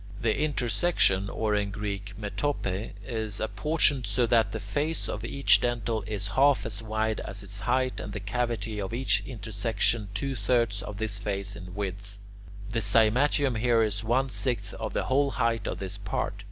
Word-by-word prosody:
The 115 Hz, -1 st, +1 dB
intersection 120 Hz, -, +1 dB
(or 110 Hz, +1 st, -1 dB
in 105 Hz, -1 st, +1 dB
Greek 100 Hz, -1 st, -5 dB
[Greek: 105 Hz, -1 st, -5 dB
metope]) 110 Hz, -8 st, -2 dB
is 110 Hz, -4 st, -3 dB
apportioned 135 Hz, +4 st, +1 dB
so 125 Hz, -, +2 dB
that 115 Hz, -3 st, +3 dB
the -, -, -3 dB
face 155 Hz, +3 st, -1 dB
of 105 Hz, -, -4 dB
each 140 Hz, +4 st, +4 dB
dentil 115 Hz, -3 st, -1 dB
is 100 Hz, -2 st, -2 dB
half 135 Hz, +8 st, +4 dB
as -, -, -3 dB
wide 110 Hz, 0 st, -1 dB
as 100 Hz, +1 st, -5 dB
its 100 Hz, +1 st, -4 dB
height 130 Hz, +4 st, 0 dB
and 105 Hz, -, -6 dB
the 105 Hz, -, -4 dB
cavity 110 Hz, 0 st, -2 dB
of 100 Hz, +4 st, -3 dB
each 130 Hz, +2 st, +2 dB
intersection 110 Hz, -2 st, -1 dB
two 135 Hz, +5 st, -1 dB
thirds 110 Hz, -2 st, +1 dB
of 105 Hz, -, -7 dB
this 105 Hz, -1 st, 0 dB
face 100 Hz, 0 st, -3 dB
in 90 Hz, -3 st, -9 dB
width. 100 Hz, 0 st, -5 dB, 0.5 s
The 115 Hz, -, 0 dB
cymatium 125 Hz, +3 st, +4 dB
here 115 Hz, -1 st, +3 dB
is 105 Hz, -1 st, -1 dB
one 130 Hz, +4 st, +1 dB
sixth 125 Hz, -1 st, +1 dB
of -, -, -5 dB
the -, -, 0 dB
whole 140 Hz, +2 st, +2 dB
height 115 Hz, -4 st, 0 dB
of -, -, -2 dB
this 95 Hz, +1 st, -5 dB
part. 100 Hz, -, -2 dB
110 Hz, 180 wpm, -28 LUFS, 100-125 Hz, 0.5 s, each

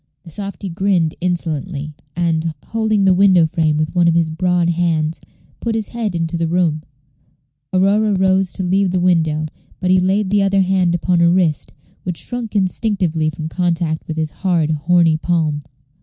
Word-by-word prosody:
The 165 Hz, -, -11 dB
softy 200 Hz, +2 st, -6 dB
grinned 175 Hz, -2 st, 0 dB
insolently, 160 Hz, -3 st, -3 dB, 0.2 s
and, 165 Hz, -2 st, -1 dB
holding 220 Hz, -3 st, 0 dB
the 190 Hz, -, +5 dB
window 185 Hz, -2 st, +5 dB
frame 155 Hz, -2 st, 0 dB
with 155 Hz, 0 st, -1 dB
one 175 Hz, -2 st, +3 dB
of 165 Hz, -, +3 dB
his 165 Hz, -2 st, +1 dB
broad 175 Hz, +1 st, +1 dB
hands, 165 Hz, -2 st, -1 dB, 0.4 s
put 230 Hz, -1 st, -2 dB
his 220 Hz, -2 st, -2 dB
head 225 Hz, -6 st, -3 dB
into 165 Hz, 0 st, -1 dB
the 165 Hz, 0 st, -1 dB
room. 165 Hz, -2 st, +1 dB, 0.9 s
Aurora 200 Hz, +3 st, +2 dB
rose 190 Hz, 0 st, +2 dB
to 190 Hz, -, -4 dB
leave 190 Hz, +2 st, +1 dB
the 180 Hz, 0 st, 0 dB
window; 160 Hz, -4 st, +1 dB, 0.3 s
but 185 Hz, -1 st, 0 dB
he 185 Hz, -, +5 dB
laid 190 Hz, +2 st, +1 dB
the 205 Hz, -1 st, +3 dB
other 195 Hz, 0 st, +2 dB
hand 185 Hz, -2 st, +2 dB
upon 175 Hz, 0 st, +1 dB
her 170 Hz, 0 st, +5 dB
wrist, 170 Hz, -4 st, +1 dB, 0.3 s
which 180 Hz, -2 st, -4 dB
shrunk 240 Hz, -3 st, -3 dB
instinctively 185 Hz, -5 st, 0 dB
from 155 Hz, 0 st, -6 dB
contact 170 Hz, -2 st, -1 dB
with 160 Hz, -, -5 dB
his 155 Hz, -1 st, -2 dB
hard, 170 Hz, -4 st, 0 dB
horny 165 Hz, +1 st, +3 dB
palm. 155 Hz, -3 st, 0 dB
175 Hz, 170 wpm, -18 LUFS, 160-190 Hz, 0.9 s, the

